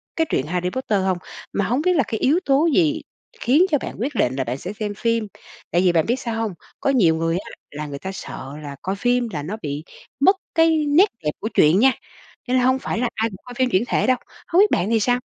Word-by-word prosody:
cái 325 Hz, -, +2 dB
truyện 130 Hz, -, 0 dB
Harry 180 Hz, +2 st, -1 dB
Potter 210 Hz, -4 st, -1 dB
hông? 185 Hz, -2 st, +1 dB, 0.4 s
Mà 200 Hz, -, 0 dB
hổng 250 Hz, +8 st, 0 dB
biết 365 Hz, +2 st, +2 dB
là 280 Hz, -, +3 dB
cái 220 Hz, -, -3 dB
yếu 305 Hz, +7 st, +3 dB
tố 280 Hz, +4 st, +3 dB
gì 315 Hz, -2 st, +2 dB, 0.4 s
khiến 290 Hz, +10 st, +4 dB
cho 295 Hz, -, +4 dB
bạn -, -, -6 dB
quyết 270 Hz, +3 st, -2 dB
định 130 Hz, -, +1 dB
là 135 Hz, -, 0 dB
bạn 125 Hz, +2 st, -3 dB
sẽ 185 Hz, +8 st, -6 dB
xem 210 Hz, -1 st, -4 dB
phim? 230 Hz, -2 st, 0 dB, 0.4 s
Tại 175 Hz, -, +3 dB
vì 180 Hz, -2 st, +4 dB
bạn 165 Hz, -2 st, +2 dB
biết 240 Hz, -, +1 dB
sao 230 Hz, -2 st, -3 dB
hông, 215 Hz, -4 st, -2 dB, 0.3 s
có -, -, 0 dB
nhiều 175 Hz, -11 st, +4 dB
người 165 Hz, +1 st, 0 dB
á, 195 Hz, -, -7 dB, 0.2 s
là 150 Hz, +1 st, -5 dB
người 140 Hz, -1 st, -6 dB
ta 190 Hz, -, -5 dB
sợ 135 Hz, -7 st, -8 dB
là 140 Hz, -1 st, -7 dB
coi 190 Hz, +1 st, -2 dB
phim 245 Hz, +2 st, +1 dB
là 145 Hz, -2 st, -3 dB
nó 205 Hz, +8 st, -4 dB
bị 145 Hz, +1 st, -4 dB, 0.4 s
mất 380 Hz, +8 st, +5 dB, 0.2 s
cái 325 Hz, -2 st, +4 dB
nét 350 Hz, +9 st, +5 dB
đẹp 150 Hz, -, 0 dB
của 220 Hz, -, -3 dB
truyện 155 Hz, +6 st, +5 dB
nha, 265 Hz, +2 st, +6 dB, 0.6 s
cho 250 Hz, -, -1 dB
nên 255 Hz, -, +4 dB
là 250 Hz, -, +2 dB
hông 260 Hz, +1 st, +3 dB
phải 230 Hz, -, -3 dB
là 245 Hz, -1 st, +1 dB
ai 225 Hz, +1 st, 0 dB
cũng 190 Hz, -, -11 dB
coi 245 Hz, -, -9 dB
phim 255 Hz, 0 st, +1 dB
chuyển 195 Hz, 0 st, +2 dB
thể -, -, +1 dB
đâu. 255 Hz, -1 st, +4 dB, 0.3 s
Hông 345 Hz, -, +3 dB
biết 415 Hz, -, +5 dB
bạn 195 Hz, -, +1 dB
thì 225 Hz, -1 st, +3 dB
sao? 245 Hz, +3 st, +2 dB
225 Hz, 265 wpm, -22 LUFS, 180-265 Hz, 0.6 s, nha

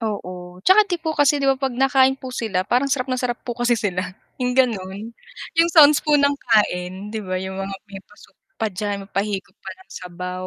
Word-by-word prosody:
Oo, 180 Hz, -4 st, -6 dB
'tsaka 380 Hz, +3 st, +7 dB
'di 355 Hz, -, 0 dB
po 320 Hz, -1 st, -1 dB
kasi 290 Hz, -1 st, +3 dB
'di 280 Hz, -, -2 dB
ba, 270 Hz, -, +1 dB
'pag 265 Hz, -2 st, -1 dB
nakain 265 Hz, 0 st, +3 dB
po 260 Hz, -1 st, -9 dB
sila 195 Hz, -7 st, -2 dB
parang 250 Hz, +6 st, +1 dB
sarap 265 Hz, -1 st, -1 dB
na 255 Hz, -, -1 dB
sarap 245 Hz, -1 st, -1 dB
po 240 Hz, -, -3 dB
kasi 240 Hz, 0 st, +1 dB
sila, 190 Hz, -4 st, -2 dB, 0.4 s
yung 250 Hz, 0 st, -1 dB
gano'n, 215 Hz, -3 st, -1 dB, 0.5 s
yung 335 Hz, +1 st, +5 dB
sounds 300 Hz, -3 st, +6 dB
po 300 Hz, -1 st, +2 dB
ng 285 Hz, 0 st, +3 dB, 0.2 s
kain, 195 Hz, -2 st, 0 dB
'di 220 Hz, -, -3 dB
ba, 185 Hz, -2 st, -4 dB
yung 190 Hz, +1 st, -5 dB
mga 195 Hz, 0 st, -4 dB, 0.2 s
may 195 Hz, -, -8 dB
pa-soup 210 Hz, +2 st, -21 dB, 0.2 s
pa 225 Hz, -, -1 dB
diyan, 200 Hz, +1 st, -4 dB
may 195 Hz, -, -20 dB
pahigop 195 Hz, -1 st, -3 dB
pa -, -, -8 dB
ng -, -, -38 dB
sabaw, 180 Hz, +1 st, -6 dB
220 Hz, 220 wpm, -21 LUFS, 190-265 Hz, 0.5 s, tsaka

